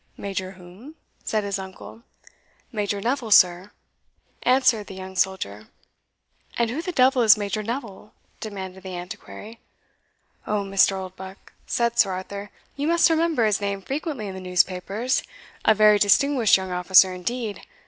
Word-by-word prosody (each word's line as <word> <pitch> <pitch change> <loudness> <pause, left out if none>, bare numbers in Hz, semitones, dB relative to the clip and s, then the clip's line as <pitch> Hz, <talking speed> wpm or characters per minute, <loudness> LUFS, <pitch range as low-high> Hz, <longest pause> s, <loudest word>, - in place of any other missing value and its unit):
"Major 190 -1 -5
whom?" 190 - -14 0.3
said 215 -1 -1
his 200 -1 -3
uncle. 190 +4 -10 0.7
"Major 205 -3 -2
Neville, 245 +1 -2
sir," 180 -1 +5 0.7
answered 255 -5 +2
the 190 - -9
young 190 0 -9
soldier. 110 - -2 0.9
"And 235 -1 +1
who 290 +6 -3
the 360 - -4
devil 260 -4 +3
is 220 -2 +7
Major 205 +1 -3
Neville?" 220 -2 -6 0.3
demanded 190 -3 -7
the 185 -1 -7
Antiquary. 205 +5 -10 0.9
"O, 210 -1 0
Mr. 195 0 +3
Oldbuck," 190 0 -10
said 235 0 0
Sir 190 - +4
Arthur, 200 +2 -7 0.3
"you 285 +2 -2
must 335 0 +4
remember 320 -7 +2
his 210 -2 +1
name 200 -1 -3
frequently 280 - -4
in 195 - -6
the 190 - -8
newspapers 185 +7 0 0.4
a 220 - +5
very 210 0 +5
distinguished 235 +3 +4
young 190 -1 -6
officer 185 +1 +5
indeed. 215 +4 -4
205 Hz, 145 wpm, -23 LUFS, 190-235 Hz, 0.9 s, is